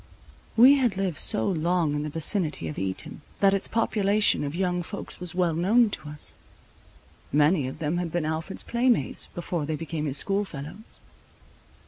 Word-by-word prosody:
We 260 Hz, +5 st, +8 dB
had 240 Hz, -8 st, +1 dB
lived 190 Hz, -5 st, -1 dB
so 110 Hz, -, +4 dB
long 170 Hz, -2 st, +1 dB
in 145 Hz, -, -1 dB
the 150 Hz, -, -3 dB
vicinity 160 Hz, -, 0 dB
of 75 Hz, -, -5 dB
Eton, 95 Hz, +8 st, -5 dB, 0.2 s
that 195 Hz, -1 st, +4 dB
its 195 Hz, -, 0 dB
population 215 Hz, -4 st, +2 dB
of 145 Hz, +2 st, -4 dB
young 180 Hz, -1 st, 0 dB
folks 200 Hz, +4 st, -8 dB
was 175 Hz, -1 st, -5 dB
well 175 Hz, -2 st, +1 dB
known 205 Hz, +7 st, +3 dB
to 150 Hz, -, -6 dB
us. 85 Hz, -, -3 dB, 0.9 s
Many 150 Hz, -1 st, +3 dB
of 130 Hz, -, -7 dB
them 160 Hz, +2 st, -2 dB
had 175 Hz, -2 st, -3 dB
been 175 Hz, -2 st, -1 dB
Alfred's 160 Hz, +4 st, -4 dB
playmates, 235 Hz, -, +1 dB
before 170 Hz, -3 st, -4 dB
they 155 Hz, -, -1 dB
became 160 Hz, -1 st, -4 dB
his 140 Hz, 0 st, +1 dB
school 200 Hz, +6 st, +2 dB
fellows. 170 Hz, +5 st, -8 dB
170 Hz, 170 wpm, -26 LUFS, 150-195 Hz, 0.9 s, We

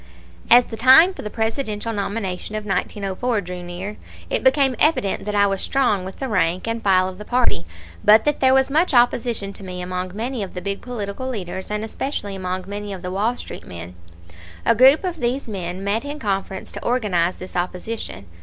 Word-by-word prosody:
As 240 Hz, +1 st, +8 dB
the 225 Hz, -, -8 dB
time 265 Hz, +10 st, +7 dB
for -, -, -8 dB
the 210 Hz, -, -5 dB
Presidential 225 Hz, -1 st, -2 dB
nomination 200 Hz, -1 st, -3 dB
of 215 Hz, -1 st, -4 dB
1904 200 Hz, +4 st, -1 dB
drew 180 Hz, -1 st, -7 dB
near, 180 Hz, +4 st, -6 dB, 0.3 s
it -, -, 0 dB
became 265 Hz, 0 st, +4 dB
evident 305 Hz, -11 st, +2 dB
that 210 Hz, 0 st, -2 dB
I 200 Hz, 0 st, +5 dB
was 195 Hz, -1 st, 0 dB
strong 245 Hz, -8 st, +1 dB
with 190 Hz, +1 st, -7 dB
the 270 Hz, -, -4 dB
rank 185 Hz, -3 st, 0 dB
and 230 Hz, 0 st, -2 dB
file 185 Hz, -2 st, +4 dB
of 185 Hz, 0 st, -8 dB
the -, -, -6 dB
party, 210 Hz, -, +1 dB, 0.4 s
but 215 Hz, +1 st, +6 dB
that 295 Hz, -1 st, +1 dB
there 260 Hz, 0 st, +5 dB
was 265 Hz, 0 st, +3 dB
much 315 Hz, 0 st, +2 dB
opposition 235 Hz, -4 st, +2 dB
to 200 Hz, -, -11 dB
me 180 Hz, -1 st, -6 dB
among 180 Hz, +1 st, -4 dB
many 240 Hz, +2 st, -3 dB
of 195 Hz, -2 st, -6 dB
the -, -, -2 dB
big 200 Hz, +1 st, -3 dB
political 245 Hz, +1 st, -5 dB
leaders, 190 Hz, -5 st, -5 dB
and 210 Hz, 0 st, -2 dB
especially 220 Hz, -3 st, -4 dB
among 185 Hz, 0 st, -3 dB
many 205 Hz, 0 st, -5 dB
of 185 Hz, -1 st, -8 dB
the 180 Hz, -, -4 dB
Wall 215 Hz, +6 st, 0 dB
Street -, -, -9 dB
men. 85 Hz, 0 st, -8 dB, 0.7 s
A -, -, +5 dB
group 265 Hz, -, +6 dB
of 355 Hz, -3 st, -3 dB
these 250 Hz, +2 st, -1 dB
men 185 Hz, -3 st, -5 dB
met 205 Hz, +4 st, 0 dB
in 290 Hz, +1 st, -5 dB
conference 195 Hz, -5 st, -3 dB
to -, -, -7 dB
organize 195 Hz, -8 st, +1 dB
this 185 Hz, -, -10 dB
opposition. 180 Hz, -, -4 dB
210 Hz, 200 wpm, -22 LUFS, 185-245 Hz, 0.7 s, As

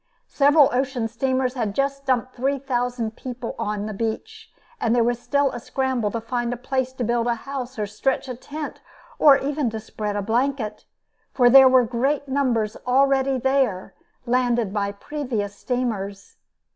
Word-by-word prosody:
Several 290 Hz, 0 st, +5 dB
ocean 255 Hz, -2 st, 0 dB
steamers 260 Hz, +2 st, -1 dB
had 220 Hz, -6 st, -2 dB
just 275 Hz, 0 st, -1 dB
dumped 255 Hz, 0 st, 0 dB
three 270 Hz, +3 st, 0 dB
thousand 245 Hz, -4 st, -2 dB
people 250 Hz, -2 st, -6 dB
on 210 Hz, 0 st, -2 dB
the 215 Hz, -, -4 dB
beach, 435 Hz, -, -5 dB, 0.3 s
and 230 Hz, +1 st, +1 dB
there 240 Hz, -, +4 dB
was 240 Hz, 0 st, 0 dB
still 280 Hz, +2 st, +1 dB
a -, -, -6 dB
scramble 255 Hz, -3 st, -1 dB
to 230 Hz, -, -3 dB
find 240 Hz, +1 st, -2 dB
a 245 Hz, -, -3 dB
place 260 Hz, +1 st, -2 dB
to 260 Hz, -, -4 dB
build 235 Hz, +1 st, 0 dB
a 240 Hz, -, +1 dB
house 265 Hz, -2 st, -5 dB
or 210 Hz, -, -1 dB
stretch 255 Hz, +7 st, -1 dB
a 255 Hz, -, -4 dB
tent, 290 Hz, +5 st, -7 dB, 0.4 s
or 280 Hz, -3 st, +7 dB
even 285 Hz, -2 st, -1 dB
to 220 Hz, 0 st, -5 dB
spread 210 Hz, -1 st, -5 dB
a 205 Hz, -, -1 dB
blanket, 230 Hz, -1 st, -1 dB, 0.5 s
for 245 Hz, -2 st, +5 dB
there 265 Hz, 0 st, +9 dB
were 255 Hz, -1 st, +5 dB
great 265 Hz, +5 st, -1 dB
numbers 245 Hz, -6 st, 0 dB
already 270 Hz, +1 st, +3 dB
there, 255 Hz, -8 st, 0 dB, 0.3 s
landed 240 Hz, -4 st, +1 dB
by 200 Hz, -1 st, -1 dB
previous 225 Hz, -3 st, -4 dB
steamers. 210 Hz, -6 st, -4 dB
250 Hz, 170 wpm, -23 LUFS, 225-270 Hz, 0.5 s, there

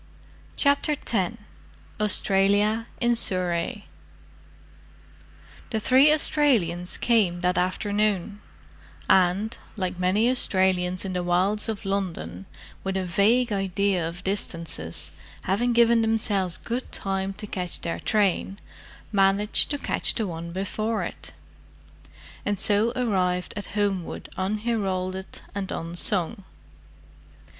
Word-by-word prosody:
CHAPTER 285 Hz, +1 st, +2 dB
X 230 Hz, -6 st, -1 dB, 0.6 s
AUSTRALIA 210 Hz, +2 st, +2 dB
IN 240 Hz, 0 st, +2 dB
SURREY 185 Hz, 0 st, 0 dB, 1.8 s
The 220 Hz, -, -1 dB
three 265 Hz, +6 st, +5 dB
Australians 230 Hz, -, +2 dB
came 200 Hz, -7 st, +2 dB
that 180 Hz, 0 st, +1 dB
afternoon; 205 Hz, +2 st, -1 dB, 0.7 s
and, 190 Hz, +4 st, +3 dB, 0.2 s
like 185 Hz, -2 st, -3 dB
many 190 Hz, +5 st, +2 dB
Australians 185 Hz, -6 st, +2 dB
in 190 Hz, -, -3 dB
the 180 Hz, -, -1 dB
wilds 185 Hz, +5 st, +1 dB
of 215 Hz, -1 st, -4 dB
London 195 Hz, -1 st, -3 dB, 0.4 s
with 190 Hz, 0 st, -2 dB
a 190 Hz, -, -2 dB
vague 220 Hz, +7 st, +2 dB
idea 195 Hz, -3 st, 0 dB
of 170 Hz, +1 st, -10 dB
distances, 170 Hz, -, -3 dB, 0.3 s
having 235 Hz, +6 st, +1 dB
given 235 Hz, 0 st, +4 dB
themselves 210 Hz, -5 st, 0 dB
good 245 Hz, +2 st, -5 dB
time 195 Hz, 0 st, -2 dB
to 210 Hz, -, -7 dB
catch 180 Hz, -4 st, -4 dB
their 170 Hz, -, -3 dB
train, 200 Hz, -2 st, 0 dB, 0.5 s
managed 200 Hz, +1 st, +4 dB
to 290 Hz, -, -1 dB
catch -, -, 0 dB
the 225 Hz, -, 0 dB
one 170 Hz, -2 st, -6 dB
before 205 Hz, +3 st, -2 dB
it; 80 Hz, -, -7 dB, 1.1 s
and 205 Hz, 0 st, -1 dB
so 210 Hz, +3 st, +3 dB
arrived 185 Hz, -7 st, 0 dB
at 205 Hz, -, -5 dB
Homewood 195 Hz, -4 st, -2 dB
unheralded 190 Hz, -2 st, -2 dB
and 200 Hz, -2 st, -4 dB
unsung. 175 Hz, +4 st, -1 dB
195 Hz, 110 wpm, -25 LUFS, 180-220 Hz, 1.8 s, three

